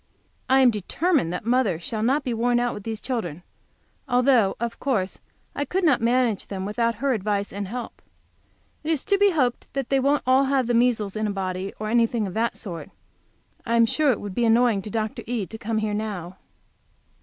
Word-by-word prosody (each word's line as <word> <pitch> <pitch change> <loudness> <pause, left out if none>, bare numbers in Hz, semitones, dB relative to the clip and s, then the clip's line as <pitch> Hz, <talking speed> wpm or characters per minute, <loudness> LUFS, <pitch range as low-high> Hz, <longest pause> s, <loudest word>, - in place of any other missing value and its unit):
I 265 +1 +5
am 250 -2 +6
determined 240 - 0
that 180 - -4
mother 235 -7 +2
shall 215 +5 -4
not 270 +6 +2
be 250 -3 -2
worn 240 +1 +2
out 245 0 0
with 205 - -7
these 220 +1 -4
children, 180 - -4 0.7
although 245 -5 +3
of 235 0 -4
course 210 -9 -1 0.3
I 285 - -2
could 365 +7 -2
not 290 -9 +3
manage 235 -2 +1
them 190 -1 -4
without 230 +3 0
her 270 +4 0
advice 205 -2 -2
and 200 0 -4
help. 240 +4 -7 0.8
It 305 - -4
is 310 -4 0
to 400 -1 +1
be 405 0 +6
hoped 260 -9 0
they 275 0 0
won't 280 +2 +2
all 260 +2 +4
have 265 -1 +1
the 240 - 0
measles 230 -4 +2
in 215 0 -1
a - - -1
body, 190 0 -3
or 215 - -3
anything 230 -1 +2
of 190 - -5
that 230 +3 0
sort; 175 -7 -6 0.7
I 235 -1 0
am 230 0 +6
sure 300 +5 +1
it 245 - +2
would 205 -2 -6
be 240 - 0
annoying 230 -2 +3
to 210 - -7
Dr. 215 0 -3
E. 235 -4 -1
to 220 - -7
come 225 +1 -2
here 215 -1 -1
now. 195 -4 -4
230 Hz, 205 wpm, -24 LUFS, 205-255 Hz, 0.8 s, am